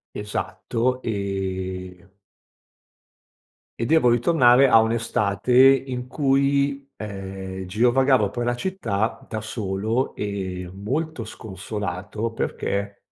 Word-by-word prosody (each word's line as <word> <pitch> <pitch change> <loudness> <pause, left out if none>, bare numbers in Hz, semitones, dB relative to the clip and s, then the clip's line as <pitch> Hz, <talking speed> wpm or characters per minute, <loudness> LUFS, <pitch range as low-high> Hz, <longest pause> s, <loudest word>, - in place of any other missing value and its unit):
Esatto, 115 +4 -2
ehm 95 -2 -4 1.6
e 115 - 0
devo 155 -3 +4
ritornare 125 0 +5
a 115 -3 +7
un'estate 110 -1 0
in 130 -1 +4
cui, 140 0 +1
ehm, 95 -2 -6
girovagavo 120 +3 +3
per 120 +3 -3
la 120 0 0
città 115 - -2
da 110 -1 -4
solo 110 +3 -2
e 95 -3 -4
molto 130 +6 -3
sconsolato 105 +1 -5
perché 100 -2 -3
110 Hz, 90 wpm, -23 LUFS, 100-125 Hz, 1.6 s, a